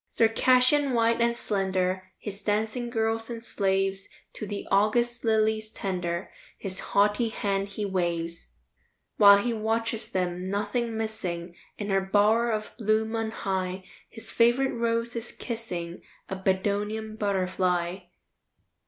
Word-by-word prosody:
Circassian 255 +4 +4
white 230 0 +3
and 235 0 +2
slender, 185 -2 -1
His 200 0 -7
dancing 220 +3 -1
girls 225 -1 -1
and 230 -1 -6
slaves, 195 -2 0 0.2
To 210 - -6
the 205 0 -5
August 235 +4 +2
lilies 220 -1 +2
tender, 180 -4 -3 0.3
His 190 -1 -5
haughty 205 +3 +2
hand 200 -2 -1
he 205 +1 -4
waves. 170 -3 -2 0.7
While 200 -1 +9
he 235 +4 0
watches 225 +1 -1
them, 180 0 -2
nothing 220 +3 -1
missing, 180 -6 -3 0.2
In 205 -1 -3
her 195 0 +3
bower 210 +4 +3
of 215 -1 -2
bloom 220 +1 +1
on 225 -1 -1
high, 190 -3 -3 0.3
His 225 -1 -9
favorite 240 +3 +3
rose 230 0 -1
is 230 0 -4
kissing 180 -8 -5 0.3
A 190 - -2
Bedouin 205 +3 -1
butterfly. 185 -3 0
210 Hz, 125 wpm, -27 LUFS, 190-225 Hz, 0.7 s, While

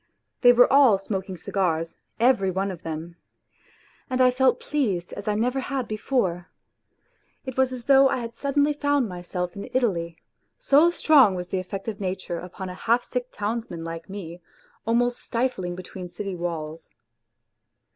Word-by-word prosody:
They 245 - +8
were 245 0 +7
all 270 -7 +7
smoking 190 -1 -4
cigars, 165 -3 -2 0.2
every 230 -5 +3
one 190 +2 -1
of 180 -2 -9
them. 165 +1 -6 0.9
And 255 - -1
I 255 -1 +6
felt 255 0 +2
pleased 205 -13 -2
as 205 - -8
I 210 - +1
never 245 +5 0
had 265 -2 -3
before. 205 -6 -1 1.0
It 260 -2 -5
was 265 -1 +2
as 250 -2 -7
though 270 0 +6
I - - 0
had 235 -1 -5
suddenly 285 +4 +1
found 285 -3 +1
myself 180 -1 -5
in 200 +5 -7
Italy 170 -10 0 0.4
so 300 +5 +5
strong 285 - +5
was 180 0 -5
the 190 - -1
effect 190 +3 -6
of 215 -2 -4
nature 185 -2 -3
upon 185 +2 -7
a 180 - -6
half 230 +6 +1
sick 250 -1 -3
townsman 210 -5 -4
like 165 +1 -7
me, 180 -3 -8 0.5
almost 240 +1 +1
stifling 230 -8 -2
between 185 0 -8
city 195 +1 -5
walls. 165 -2 -5
205 Hz, 160 wpm, -25 LUFS, 180-255 Hz, 1.0 s, They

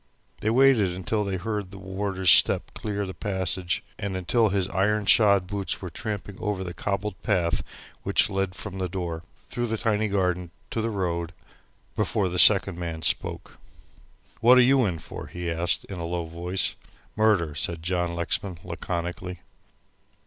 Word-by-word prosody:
They 110 - 0
waited 115 -7 +4
until 105 +4 -1
they 100 -2 -2
heard 105 0 -3
the 100 - -11
warder's 95 -1 0
step - - +4
clear 105 -1 -3
the 95 - -6
passage, 95 -2 -1 0.2
and 100 -2 -3
until 110 +5 +2
his 95 -2 0
iron 105 +3 +1
shod 100 -3 +5
boots 100 0 -3
were 90 -3 -7
tramping 100 +1 -5
over 105 -3 -2
the 90 -1 -6
cobbled 100 +1 -3
path 90 -5 +1 0.4
which - - +3
led 95 -1 -2
from 95 -2 -6
the 90 -1 -2
door, 85 -3 -4 0.3
through 120 0 -1
the 110 0 -1
tiny 110 -1 +1
garden 90 -3 0 0.2
to 115 - -1
the 115 - -1
road, 85 -5 -2 0.6
before 95 -3 0
the 90 0 -1
second 100 -3 +7
man 80 -2 -5
spoke. - - -1 0.8
"What 125 +2 +7
are - - +8
you 130 0 +4
in 90 -4 -1
for?" - - -8
he 90 -1 -4
asked, 85 +1 +1
in 95 -3 -7
a 85 - -3
low 85 0 -2
voice. 85 +3 -2 0.4
"Murder," 105 -8 +2
said 80 +2 -2
John 90 -1 -1
Lexman, 85 +2 -1
laconically. 90 +1 -5
95 Hz, 165 wpm, -26 LUFS, 90-105 Hz, 0.8 s, are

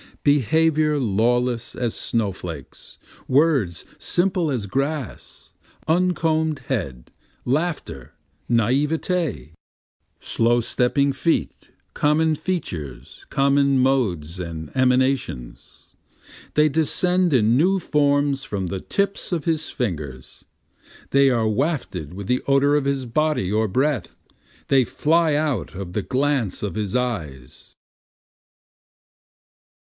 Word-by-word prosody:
Behavior 150 +2 +3
lawless 120 +1 0
as 120 -3 -2
snow 110 -4 -1
flakes, 85 -7 -9 0.3
words 130 - +2
simple 175 -3 0
as 115 -6 -2
grass, 135 - -4 0.3
uncomb'd 160 -3 +1
head, 70 - -3 0.3
laughter, 145 - -2 0.3
and 120 - +2
naivete, 145 - 0 0.7
Slow 120 +1 +2
stepping 125 +4 +1
feet, 165 +4 -1 0.2
common 155 +2 +2
features, 80 - -5
common 140 0 +3
modes 95 - 0
and 80 -3 -6
emanations, 130 - -1 0.7
They 150 0 +4
descend 180 +4 +1
in 115 -3 +3
new 190 +6 +3
forms 145 -3 +1
from 95 -3 -3
the 95 +2 -4
tips 200 - -1
of 165 -5 -2
his 160 -2 0
fingers, 75 - -5 0.7
They 140 0 +5
are 115 -3 +1
wafted 110 - -2
with 100 +2 -7
the 125 +1 +1
odor 140 +1 +4
of 145 -2 +1
his 140 -2 -1
body 135 -6 0
or 110 +1 +1
breath, 130 +5 -1 0.5
they 135 -2 +4
fly 160 +4 +1
out 145 - -1
of 90 -2 -6
the 105 - -1
glance 135 -5 0
of 105 - -2
his 105 0 -3
eyes. 80 - -4
130 Hz, 110 wpm, -22 LUFS, 105-150 Hz, 0.7 s, They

